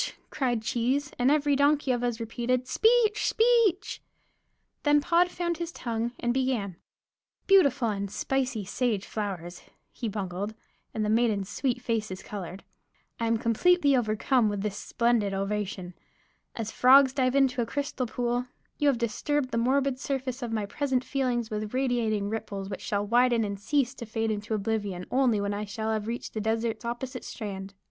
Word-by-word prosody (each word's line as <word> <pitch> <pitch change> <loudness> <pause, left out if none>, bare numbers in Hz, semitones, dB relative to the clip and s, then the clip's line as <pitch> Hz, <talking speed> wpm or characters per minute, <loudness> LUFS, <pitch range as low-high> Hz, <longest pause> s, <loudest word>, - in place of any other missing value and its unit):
cried 240 -5 0
Cheese, 260 +6 0
and 245 +2 +4
every 290 -1 +3
donkey 285 -1 +3
of 245 -1 0
us 240 -1 -1
repeated, 240 +2 -1
"Speech, 445 - +3
Speech!" 450 -4 +2 0.8
Then 295 0 +4
Pod 345 +4 +3
found 345 -1 -2
his 340 0 -4
tongue 235 -4 -3
and 240 0 0
began: 245 -9 -1 0.7
"Beautiful 290 -11 +4
and 200 -1 -2
spicy 255 -2 -1
sage 215 -1 -1
flowers," 180 -5 -5 0.3
he 235 - -4
bungled; 200 +1 -4 0.4
and 215 -1 -2
the - - 0
maidens' 215 -3 +2
sweet 245 +3 -1
faces 215 -5 -2
colored, 190 -2 -7 0.6
"I 230 - 0
am 230 0 +2
completely 285 +6 +3
overcome 230 0 +2
with 205 -1 -3
this 210 -2 -2
splendid 225 -3 +1
ovation. 195 -2 -3 0.6
As 220 -2 -4
frogs 265 +1 +6
dive 255 -1 +1
into 265 -3 +3
a 230 - -2
crystal 285 -3 -2
pool, 245 +1 -1 0.3
you 295 - +2
have 275 -4 +4
disturbed 255 +4 -1
the 230 - 0
morbid 265 +2 +1
surface 265 -2 -3
of 240 -2 -4
my 215 -2 -1
present 260 +3 -1
feelings 250 -5 -1
with 215 +2 -3
radiating 235 -6 0
ripples 205 -2 -4
which 190 - -5
shall 205 0 -1
widen 240 +1 +3
and 200 -1 -3
cease 260 +3 +1
to 235 -3 -8
fade 225 0 -1
into 210 +1 -2
oblivion 205 -3 -2
only 250 -5 +3
when 200 0 -1
I 205 +1 -3
shall 220 +2 -3
have 215 -1 -2
reached 235 +1 -4
the 215 - -2
desert's 225 +2 -1
opposite 240 +2 -4
strand. 195 -3 -6
235 Hz, 165 wpm, -28 LUFS, 210-265 Hz, 0.8 s, frogs